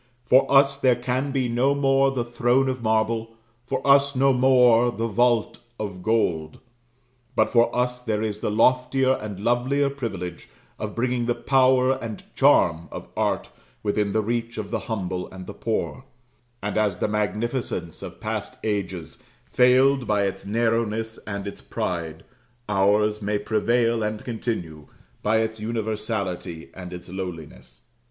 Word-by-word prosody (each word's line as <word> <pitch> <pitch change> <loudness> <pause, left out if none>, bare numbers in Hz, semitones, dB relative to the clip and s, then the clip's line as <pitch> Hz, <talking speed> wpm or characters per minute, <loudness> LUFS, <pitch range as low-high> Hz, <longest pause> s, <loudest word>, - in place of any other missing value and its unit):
For 130 +2 +4
us 140 0 +5
there 130 -3 +3
can 125 +3 -2
be 130 -2 0
no 125 +4 +2
more 135 -1 +3
the 130 -3 -2
throne 120 +2 +2
of 130 -1 -3
marble 110 0 0 0.3
for - - -2
us 140 0 +5
no 135 +1 +4
more 125 -2 +5
the 115 -1 -3
vault 115 0 +1 0.2
of 100 -4 -5
gold 85 -8 0 0.8
but - - +2
for 120 -1 +4
us 125 0 0
there 110 -3 -1
is 105 -1 -3
the - - -2
loftier 125 +4 +3
and 105 -5 -5
lovelier 130 +5 +1
privilege 95 -10 -6 0.3
of 105 -1 -5
bringing 120 0 0
the 120 - +1
power 130 -1 +3
and 110 -2 -6
charm 90 - +3
of - - -8
art - - -1 0.3
within 105 -1 0
the 110 - +1
reach 115 +1 -2
of 105 -2 -5
the - - 0
humble 95 -4 -3
and 95 -1 -9
the - - -8
poor; 115 +3 -3 0.6
and 105 +1 -2
as 105 -4 +1
the - - 0
magnificence 105 -3 -2
of - - -8
past - - -4
ages 95 -6 -3 0.3
failed 130 +1 +4
by 105 -1 +2
its 100 0 -3
narrowness 115 0 0
and 100 -2 -4
its 100 - -7
pride, 80 -2 -4 0.4
ours 105 +1 +2
may 105 0 0
prevail 115 +2 +1
and 105 0 -3
continue, 90 - -4 0.3
by 110 +1 +2
its 110 0 -1
universality 105 -6 -3
and 90 -1 -9
its 90 0 -8
lowliness. 85 -9 -8
110 Hz, 150 wpm, -24 LUFS, 100-125 Hz, 0.8 s, us